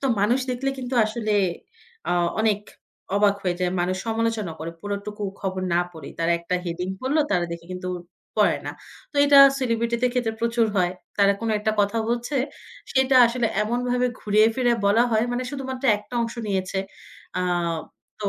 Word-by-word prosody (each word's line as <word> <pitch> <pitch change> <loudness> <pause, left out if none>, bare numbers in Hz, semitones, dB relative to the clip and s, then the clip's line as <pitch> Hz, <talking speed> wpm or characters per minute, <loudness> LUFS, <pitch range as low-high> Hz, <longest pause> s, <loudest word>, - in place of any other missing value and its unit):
তো 275 - 0
মানুষ 240 +6 +3
দেখলে 265 +2 -1
কিন্তু 250 0 -4
আসলে 215 -1 -2 0.8
আ - - +3 0.3
অনেক 210 -2 +2 0.6
অবাক 205 -1 +4
হয়ে 180 -2 0
যায়। 180 -1 +1
মানুষ 185 +1 0
সমালোচনা 225 -5 -1
করে 165 +1 -5
পুরোটুকু 205 +1 -5 0.2
খবর 190 -1 -3
না 175 - +4
পড়েই। 160 -4 -10
তারা 165 +1 +2
একটা 175 +2 -2
heading 180 +2 -3
পড়লো 280 +4 +1
তারা 175 -1 +2
দেখে 170 0 -8
কিন্তু 185 0 -5 0.5
পড়ে - - +4
না। - - -2 0.4
তো - - -9
এটা 285 -1 +7 0.2
সেলিব্রিটিদের 235 0 0
খেতে 245 -3 +1
প্রচুর 235 -1 +2
হয়। 180 -1 +2 0.3
তারা 200 0 +5
কোনো 230 - -1
একটা 215 +1 0
কথা 205 +3 +1
বলছে, 240 +4 -1 0.6
সেটা 265 0 +3
আসলে 235 0 0 0.2
এমনভাবে 245 +2 0
ঘুরিয়ে 215 +1 +4
ফিরেয়ে 240 -2 +2
বলা 220 +4 +5
হয় 220 +1 +2
মানে 250 +1 -1
শুধুমাত্র 265 -2 -5
একটা 210 +4 -12
অংশ 230 - -4
নিয়েছে। 190 -1 -1 0.6
আ - - 0 0.8
তো 205 - 0
220 Hz, 165 wpm, -24 LUFS, 190-245 Hz, 0.8 s, এটা